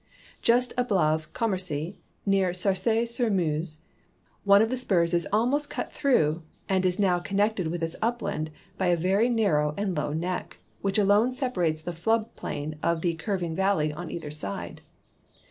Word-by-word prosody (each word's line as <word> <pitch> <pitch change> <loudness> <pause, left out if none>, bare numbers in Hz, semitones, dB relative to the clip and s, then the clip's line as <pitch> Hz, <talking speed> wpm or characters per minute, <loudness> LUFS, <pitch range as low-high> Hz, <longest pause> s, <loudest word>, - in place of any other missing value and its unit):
Just 245 +1 +3
above 160 -10 +1
Com 230 -2 0
mercy, 180 -1 -3 0.3
near 195 -3 +2
Sarcy 215 +5 +1
sur 235 0 0
Meuse, 160 -4 -1 0.6
one 200 0 +7
of 220 +2 +2
the - - +1
spurs 180 -9 +2
is 170 -1 +1
almost 255 +8 +1
cut - - -4
through 165 - +2 0.3
and 190 -1 +1
is 180 - 0
now 185 -3 +2
connected 200 0 0
with 170 +1 -3
its 165 0 -2
upland 225 -9 -1 0.3
l>y 190 - +1
a 175 -1 +3
very 195 +7 +2
narrow 150 -11 +2
and 200 -3 -1
low 150 -1 -1
neck, 175 +4 -3 0.2
which 195 0 0
alone 210 +4 +4
separates 180 - 0
the 175 - -4
Hood 220 +7 0
plain 150 +1 -5
of 170 -1 +1
the 170 -1 0
curv 190 +2 -2
ing 165 -1 -2
valley 190 -6 +1
on 170 +2 -6
either 155 -3 -6
side. 125 -10 -6
185 Hz, 170 wpm, -27 LUFS, 160-220 Hz, 0.6 s, one